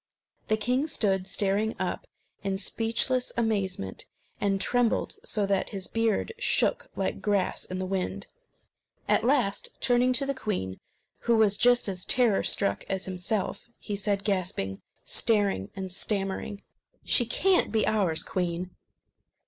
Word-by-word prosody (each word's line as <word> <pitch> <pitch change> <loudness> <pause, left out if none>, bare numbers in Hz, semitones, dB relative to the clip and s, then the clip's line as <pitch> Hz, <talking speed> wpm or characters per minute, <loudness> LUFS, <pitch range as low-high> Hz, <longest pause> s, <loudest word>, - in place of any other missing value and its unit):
The 215 - +2
king 250 +7 +1
stood 190 -9 +1
staring 205 +3 +1
up - - -3 0.3
in 195 -1 -1
speechless 230 +5 0
amazement, 195 - -1 0.3
and 195 -1 +1
trembled 245 +4 +1
so 210 -2 0
that 195 -1 0
his 195 -3 -5
beard 225 - 0
shook - - +1
like - - -2
grass 200 -3 0
in 185 - -5
the 185 - -2
wind. 190 +1 -2 0.8
At - - +3
last, 245 -6 +1
turning 245 0 +3
to 260 +3 +4
the 275 - -1
queen, 185 - -3 0.4
who 235 -1 +2
was 210 -2 +4
just 245 +1 +4
as 185 -2 -1
horror 240 -6 +4
struck 100 0 0
as 190 -1 -1
himself, 190 +4 -2
he 205 - -5
said, 200 0 0
gasping, 180 - -1 0.2
staring, 200 - +1
and 190 -1 -5
stammering: 195 +1 -3 0.4
"She 240 - +3
can't 375 +9 +3
be 220 -1 +2
ours, 185 -7 +1
queen!" 180 0 -2
200 Hz, 140 wpm, -28 LUFS, 190-230 Hz, 0.8 s, to